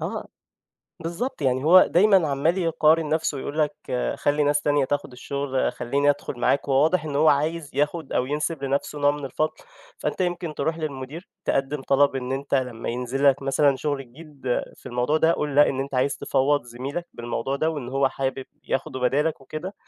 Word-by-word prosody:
آه. - - -4 0.7
بالضبط. 170 - -4
يعني 130 0 +1
هو 180 +4 +8
دايمًا 190 -2 +4
عمّال 150 +6 +1
يقارن 160 -2 +3
نَفسه 155 -2 0
يقول 145 +3 -5
لك: 150 -1 +1 0.4
"خلّي 145 +1 +1
ناس 145 0 +2
تانية 145 -2 +2
تاخُد 145 -1 -2
الشُغل، 135 +1 -2
خلّيني 140 +4 +1
أدخُل 135 -3 -4
معاك." 140 +3 +1
وهو 135 +1 +4
واضح 160 0 +2
إن 145 -2 -3
هو 155 +2 +5
عايز 150 +1 +1
ياخُد 150 +1 -1
أو 125 - +1
ينسب 150 +1 -2
لنَفسه 140 +2 -2
نوع 145 0 +4
من 145 -1 -5
الفضل، 155 +4 -1 0.5
فأنت - - -3
يمكن 175 -3 -1
تروح 160 0 -1
للمدير 150 +3 -6 0.2
تقدِّم 135 +1 -1
طلب 140 0 +3
إن 130 0 -3
أنت 140 +1 -2
لمّا 125 -4 -1
ينزل 125 +3 -2
لك 140 0 +2
مثلًا 135 0 +3
شُغل 145 0 -2
جديد 145 +3 -15 0.3
في - - -17
الموضوع 125 +5 0
ده، 160 +1 +4
قل 150 -3 -2
لأ 145 +1 +6
إن 135 0 -1
أنت 140 0 -5
عايز 135 +2 +1
تفوّض 140 +2 +1
زميلك 135 +8 -5
بالموضوع 120 +3 -3
ده 160 +3 +1
وان 145 -6 -5
هو 135 +1 +2
حابب 135 0 -3 0.2
ياخده 135 -1 -2
بدالك 145 +5 +1
وكده 155 +8 -7
145 Hz, 185 wpm, -24 LUFS, 135-155 Hz, 0.7 s, هو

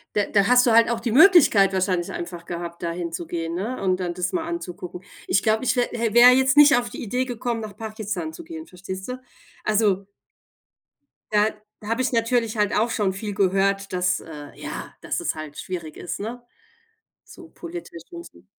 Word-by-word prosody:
d 205 -1 +1
da 200 -1 +4
hast 250 0 +5
du - - +4
halt 230 0 +5
auch 235 - -1
die 235 - -2
Möglichkeit 270 - +6
wahrscheinlich 185 -2 0
einfach 175 -1 -7
gehabt, 170 0 -6
dahin 170 0 -3
zu 170 0 -5
gehen, 165 -1 -3
ne, 220 +8 -4
und 185 -1 +1
dann 175 -2 -2
das 180 0 -2
mal 340 -3 -1
anzugucken. 180 - -6 0.3
Ich 195 - +2
glaube, 220 +2 +2
ich 255 - +2
wä 245 - +4
hä 230 -2 -1
wäre 240 +1 +9
jetzt 265 +2 +3
nicht 295 -2 +8
auf 240 0 -2
die - - -7
Idee 250 +4 -1
gekommen, 240 -1 -3
nach 215 -2 -8
Pakistan 220 +6 -5
zu 340 +1 -10
gehen, 320 -1 -8
verstehst 190 +1 -8
du? 250 0 -5 0.4
Also 205 -3 +1 1.3
da 210 +1 +4 0.3
da 210 - -9
habe 230 +3 -1
ich 260 - +1
natürlich 230 -1 +1
halt 210 0 +1
auch 225 +3 +2
schon 205 -4 0
viel 205 +1 -5
gehört, 195 +1 +1
dass 180 0 +1
äh, 150 -3 -10
ja, - - -7
dass - - -2
es - - -2
halt 155 -2 -8
schwierig 170 -4 -6
ist, 175 - -5
ne? 235 +4 -6 0.8
So 350 -2 -14
politisch 170 - -9
und 340 0 -8
so. - - -17
210 Hz, 200 wpm, -23 LUFS, 180-240 Hz, 1.3 s, wäre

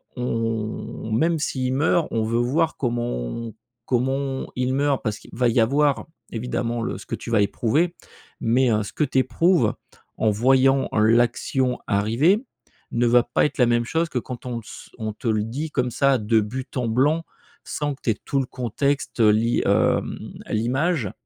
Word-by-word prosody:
on 115 -2 -3
même 160 +8 +2
s'il 130 -3 -1
meurt, 155 +3 +2
on 110 -1 0
veut 115 +2 0
voir 155 +7 +1
comment 120 -2 -1
on 105 - -5 0.3
comment 135 +2 -1
il 125 +1 0
meurt 140 0 +1
parce 110 -2 -2
qu'il - - -16
va 125 0 +2
y 115 - +2
avoir 140 +5 +2 0.3
évidemment 120 0 -2
le 115 - -3
ce - - -11
que - - -3
tu - - -8
vas 115 -3 +3
éprouver 145 - +1 0.4
mais, 125 +2 +2
heu, 105 -1 +1
ce 100 - -8
que - - 0
tu 135 -2 -1
éprouves 130 - +2 0.4
en 110 - +2
voyant 130 +5 +3
l'action 120 +3 +2
arriver 125 - +2 0.5
ne 120 +1 +1
va 120 0 +5
pas 120 - 0
être 150 - -3
la 125 - +5
même 120 0 +2
chose 165 +5 0
que 125 - -1
quand 125 +1 -8
on 125 -2 -3
le 115 - -5
s 110 - -11
on 110 -2 -3
te 115 - -7
le 110 -2 +2
dit 140 +8 -4
comme 125 -3 0
ça 140 +1 +3
de 110 0 +2
but 130 +6 -5
en 125 -2 0
blanc 145 +8 +2 0.4
sans 145 -1 -2
que - - -30
tu - - 0
aies 105 - -3
tout 140 - 0
le 135 - 0
contexte, 130 +3 -2
heu, 105 -1 +6
l'i 115 +3 +2
hem, - - +2 0.3
l'image 125 - 0
125 Hz, 190 wpm, -23 LUFS, 115-140 Hz, 0.5 s, heu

